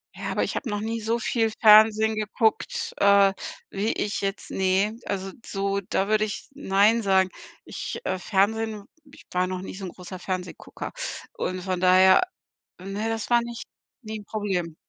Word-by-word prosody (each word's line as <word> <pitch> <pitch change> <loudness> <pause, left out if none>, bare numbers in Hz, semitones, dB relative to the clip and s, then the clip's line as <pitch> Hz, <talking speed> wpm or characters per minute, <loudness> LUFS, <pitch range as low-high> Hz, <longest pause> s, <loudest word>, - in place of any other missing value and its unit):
Ja, - - -4
aber - - 0
ich - - -3
habe 255 - -3
noch 205 -1 -2
nie 225 +1 -2
so 225 +2 0
viel 225 -1 0
Fernsehen 220 0 +7
geguckt, 215 +1 -1
äh, 200 -1 +5 0.4
wie 205 +3 -1
ich 205 0 -2
jetzt 195 +1 -3
ne, 190 +3 +1
also 195 -1 -3
so 195 0 -1
da 195 +1 -1
würde 215 0 +2
ich 210 - -4
„Nein“ 220 -4 +3
sagen. 190 -1 +3 0.4
Ich, - - -5
äh 185 - -1
Fernsehen 210 +2 0 0.3
ich - - -16
war 180 0 +1
noch 185 0 -4
nie 190 - -7
so 190 0 -6
'n - - -5
großer 180 0 -9
Fernsehgucker 185 -1 -5 0.4
und 185 0 -3
von 185 -1 -2
daher 185 - +6 0.6
Ne, 200 +4 -3
das 225 -1 -3
war 240 -1 +4
nicht 235 -1 -7 0.4
nie 220 0 -6
'n - - -13
Problem. 190 -7 -3
200 Hz, 175 wpm, -25 LUFS, 190-220 Hz, 0.6 s, Fernsehen